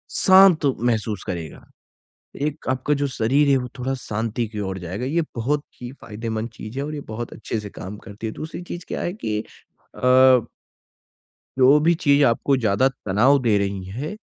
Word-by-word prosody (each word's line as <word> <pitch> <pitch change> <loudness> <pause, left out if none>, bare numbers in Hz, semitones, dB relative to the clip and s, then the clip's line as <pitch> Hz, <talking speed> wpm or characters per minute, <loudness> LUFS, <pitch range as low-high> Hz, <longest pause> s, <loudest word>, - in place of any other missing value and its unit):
शांत 190 -4 +6
महसूस 110 -4 -1
करेगा। 85 -5 -6 0.8
एक 150 +1 -3
आपका 130 +3 0
जो 145 0 0
शरीर 135 +3 +2
है 135 - +5
वो 125 -1 -4
थोड़ा 130 +2 -1
शांति 115 -1 -3
की 105 0 -7
ओर 95 -2 -3
जाएगा। 95 +7 -5
ये 160 +6 +1
बहुत 140 +5 -1 0.2
ही 120 0 -6
फ़ायदेमंद 110 +1 -4
चीज 110 +3 -9
है 140 - -1
और 150 +1 -5
ये 145 - -5
बहुत 115 +2 -6
अच्छे 115 0 -4
से 105 -1 -8
काम 100 +1 -8
करती 105 +2 -7
है। 110 - -5
दूसरी 160 +3 -7
चीज 175 0 -7
क्या - - -4
है 175 - -2
कि 110 - -3 0.6
अ 130 -1 +6 1.1
जो 135 +3 +6
भी 165 +3 +3
चीज़ 145 -4 +3
आपको 135 +3 +2
ज़्यादा 115 +1 +2 0.2
तनाव 120 +9 +4
दे 110 -4 +3
रही 100 -1 -2
है। 130 - -6
120 Hz, 180 wpm, -22 LUFS, 105-145 Hz, 1.1 s, शांत